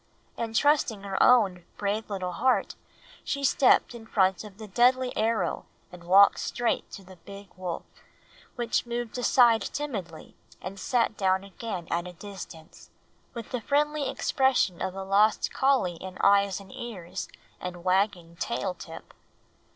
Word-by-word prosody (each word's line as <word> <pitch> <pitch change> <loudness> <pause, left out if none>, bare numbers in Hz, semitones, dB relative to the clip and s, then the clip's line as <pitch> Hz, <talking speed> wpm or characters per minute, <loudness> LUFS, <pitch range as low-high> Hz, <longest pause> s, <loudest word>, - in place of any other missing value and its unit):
And 225 -1 -4
trusting 275 -7 +2
her 195 -1 -2
own 200 -8 +4
brave 210 +2 -2
little 185 -3 -3
heart 255 +8 +1 0.5
she 280 -1 -3
stepped 265 -2 +4
in 225 -2 -11
front 190 -3 +2
of 205 -2 -12
the 215 -1 -9
deadly 250 +4 +2
arrow 225 +1 -1 0.2
and 175 -1 -12
walked 195 +3 +6
straight 240 -1 -1
to 195 - -9
the 185 0 -15
big 200 +3 -12
wolf, 180 -2 -5 0.7
which 240 0 -1
moved 240 -1 -4
aside 240 -2 +5
timidly 200 - -6 0.2
and 190 +2 -8
sat 230 +2 +1
down 190 -1 +1
again 195 -3 -6
at 170 +1 -1
a 180 - -9
distance, 175 -4 -11 0.5
with 230 -2 -7
the 250 - -2
friendly 295 +3 0
expression 265 -9 +1
of 190 - -3
a 195 - -5
lost 205 +3 +2
collie 260 -11 +2
in 185 0 -8
eyes 200 -1 +4
and 195 -1 -14
ears 195 -8 -6 0.3
and 180 -1 -7
wagging 185 -2 0
tail 180 - -2
tip. 165 -2 -11
200 Hz, 150 wpm, -27 LUFS, 185-240 Hz, 0.7 s, walked